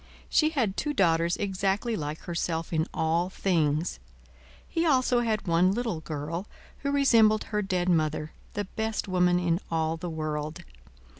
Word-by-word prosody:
She 310 Hz, -, +4 dB
had 240 Hz, -11 st, -1 dB
two 295 Hz, -1 st, -1 dB
daughters 170 Hz, -3 st, +2 dB
exactly 200 Hz, +3 st, -1 dB
like 150 Hz, -3 st, -4 dB
herself 170 Hz, -1 st, -3 dB
in 160 Hz, 0 st, +1 dB
all 165 Hz, +3 st, 0 dB
things. 165 Hz, -4 st, 0 dB, 0.7 s
He 330 Hz, -, -1 dB
also 255 Hz, -5 st, +3 dB
had 220 Hz, -3 st, 0 dB
one 175 Hz, +1 st, +3 dB
little 225 Hz, -7 st, -2 dB
girl, 160 Hz, +5 st, -5 dB, 0.3 s
who 280 Hz, -, -2 dB
resembled 230 Hz, -7 st, +4 dB
her 210 Hz, -1 st, -2 dB
dead 185 Hz, -3 st, -1 dB
mother, 155 Hz, -3 st, +1 dB, 0.2 s
the 205 Hz, -, -2 dB
best 220 Hz, +2 st, -3 dB
woman 180 Hz, -1 st, +3 dB
in 175 Hz, -1 st, +1 dB
all 160 Hz, 0 st, 0 dB
the 175 Hz, +2 st, -5 dB
world. 155 Hz, -1 st, -4 dB
180 Hz, 150 wpm, -28 LUFS, 160-215 Hz, 0.7 s, She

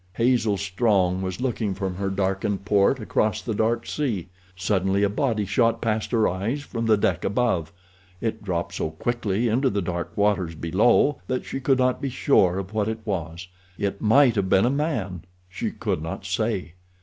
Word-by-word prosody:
Hazel 115 Hz, -3 st, +2 dB
Strong 95 Hz, -2 st, +1 dB
was 95 Hz, +1 st, -4 dB
looking 115 Hz, -6 st, -1 dB
from 95 Hz, -1 st, -3 dB
her 100 Hz, 0 st, -1 dB
darkened 95 Hz, +1 st, -1 dB
port 105 Hz, +5 st, +3 dB
across 110 Hz, -2 st, 0 dB
the 115 Hz, -, -4 dB
dark 115 Hz, +2 st, 0 dB
sea. 110 Hz, -, -2 dB, 0.3 s
Suddenly 95 Hz, +1 st, +1 dB
a 100 Hz, -, +3 dB
body 110 Hz, -2 st, 0 dB
shot 115 Hz, +3 st, +2 dB
past 110 Hz, -1 st, -1 dB
her 115 Hz, -3 st, +3 dB
eyes 110 Hz, +11 st, -2 dB
from 115 Hz, -4 st, -3 dB
the 110 Hz, -1 st, +5 dB
deck 90 Hz, -3 st, 0 dB
above. 100 Hz, -7 st, 0 dB, 0.5 s
It 110 Hz, 0 st, -3 dB
dropped 85 Hz, -4 st, -2 dB
so -, -, -2 dB
quickly 115 Hz, +5 st, -1 dB
into 130 Hz, +4 st, +2 dB
the 100 Hz, -, -1 dB
dark 85 Hz, 0 st, -4 dB
waters 100 Hz, -5 st, +1 dB
below 100 Hz, -, +3 dB
that 130 Hz, 0 st, -2 dB
she -, -, -4 dB
could 135 Hz, 0 st, +2 dB
not 125 Hz, 0 st, +1 dB
be 140 Hz, -, -1 dB
sure 95 Hz, -8 st, +3 dB
of 95 Hz, +1 st, -5 dB
what 110 Hz, -1 st, 0 dB
it 110 Hz, 0 st, -3 dB
was—it 90 Hz, +1 st, -5 dB
might 120 Hz, +3 st, +5 dB
have 100 Hz, -3 st, -1 dB
been 95 Hz, +4 st, +4 dB
a 125 Hz, -, +2 dB
man, 120 Hz, -, -2 dB, 0.3 s
she 90 Hz, -, -3 dB
could -, -, -3 dB
not 80 Hz, +4 st, -6 dB
say. 95 Hz, -3 st, -2 dB
105 Hz, 180 wpm, -24 LUFS, 95-115 Hz, 0.5 s, the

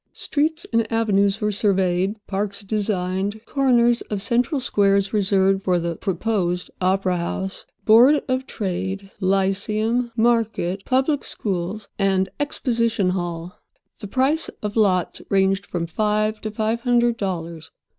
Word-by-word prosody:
Streets 315 Hz, +4 st, -1 dB
and 230 Hz, -1 st, +1 dB
avenues 205 Hz, -2 st, +2 dB
were 210 Hz, 0 st, +1 dB
surveyed; 195 Hz, -1 st, +1 dB
parks 200 Hz, +1 st, -3 dB
designed; 200 Hz, 0 st, -2 dB
corners 240 Hz, -3 st, +3 dB
of 210 Hz, -, -2 dB
central 245 Hz, +6 st, 0 dB
squares 200 Hz, -4 st, +2 dB
reserved 195 Hz, -1 st, +2 dB
for 180 Hz, -2 st, +1 dB
the 170 Hz, 0 st, -2 dB
"proposed" 180 Hz, -1 st, -1 dB
opera 185 Hz, 0 st, +1 dB
house, 190 Hz, +3 st, -4 dB, 0.2 s
board 245 Hz, +7 st, +6 dB
of 260 Hz, 0 st, -1 dB
trade, 190 Hz, 0 st, -4 dB
lyceum, 210 Hz, +5 st, 0 dB
market, 220 Hz, -5 st, +1 dB
public 270 Hz, +3 st, +1 dB
schools, 195 Hz, +1 st, -3 dB
and 190 Hz, -1 st, +2 dB
"Exposition 230 Hz, -8 st, 0 dB
Hall." 175 Hz, 0 st, -4 dB, 0.4 s
The 205 Hz, -, -6 dB
price 270 Hz, +8 st, +1 dB
of 210 Hz, 0 st, -3 dB
lots 190 Hz, -5 st, +1 dB
ranged 195 Hz, 0 st, +2 dB
from 170 Hz, -2 st, -3 dB
five 215 Hz, +4 st, 0 dB
to 215 Hz, -, -3 dB
five 220 Hz, +2 st, -1 dB
hundred 240 Hz, -1 st, +2 dB
dollars. 170 Hz, -5 st, -4 dB
205 Hz, 125 wpm, -22 LUFS, 190-230 Hz, 0.4 s, board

